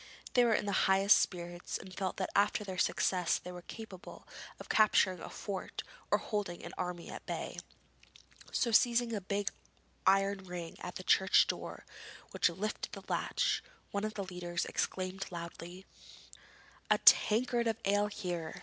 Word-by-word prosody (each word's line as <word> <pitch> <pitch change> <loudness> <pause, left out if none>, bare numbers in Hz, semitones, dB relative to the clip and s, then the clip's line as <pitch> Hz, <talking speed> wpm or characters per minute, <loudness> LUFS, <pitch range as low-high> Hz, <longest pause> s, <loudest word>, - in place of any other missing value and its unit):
They 245 - +5
were 230 -2 +4
in - - -1
the 200 -1 +2
highest 195 +2 +6
spirits 175 -1 -3
and 185 - -11
felt 190 -2 -2
that 190 - -2
after 205 +1 +3
their 190 -2 -5
success 180 -2 +2
they 180 - -8
were 180 0 -8
capable 195 -1 -10 0.3
of - - -9
capturing 190 -4 +4
a - - -7
fort 195 -3 -5 0.3
or - - +4
holding 205 -5 -3
an 170 - -8
army 180 -2 -4
at - - -9
bay. - - -4 0.9
So 235 - +1
seizing 235 +1 +4
the 215 -3 -2
big 200 +1 -1 0.6
iron 195 +1 +4
ring 180 -3 -7
on 180 - -5
the 185 - -6
church 190 +1 +5
door - - -5 0.5
which - - +3
lifted 195 +5 -4
the - - -8
latch, - - 0 0.3
one 200 0 -2
of 215 0 -3
the 200 - -2
leaders 180 -2 -3
exclaimed 185 +1 -3
loudly: 175 +2 -8 1.0
'A - - +5
tankard 235 +2 +5
of 225 - 0
ale 205 +1 +3
here!' 175 -6 -4
190 Hz, 160 wpm, -33 LUFS, 180-210 Hz, 1.0 s, highest